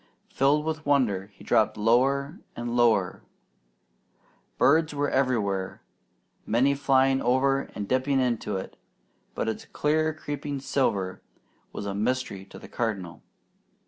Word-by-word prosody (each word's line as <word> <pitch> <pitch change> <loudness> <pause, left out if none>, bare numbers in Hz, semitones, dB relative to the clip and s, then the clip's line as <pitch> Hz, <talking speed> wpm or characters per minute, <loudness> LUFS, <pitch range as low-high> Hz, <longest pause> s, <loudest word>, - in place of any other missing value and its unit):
Filled 145 +3 +2
with 155 -1 -3
wonder 120 -10 +1
he 100 - -18
dropped 110 -1 +2
lower 135 - +2 0.2
and 120 0 -4
lower. 110 -6 +2 1.4
Birds 155 +1 +3
were 145 0 0
everywhere, 105 -8 0 0.6
many 130 +5 +2
flying 135 -1 +2
over 135 +2 +1
and 100 -1 -4
dipping 130 +3 +1
into 120 -5 -1
it; 95 - -8 0.6
but - - -2
its 110 - -3
clear 155 +1 0
creeping 145 -2 -5
silver 100 -9 -1 0.5
was 100 - -6
a 100 - -3
mystery 105 -2 -2
to - - -13
the - - -11
Cardinal. 100 -8 -4
130 Hz, 125 wpm, -26 LUFS, 105-140 Hz, 1.4 s, Birds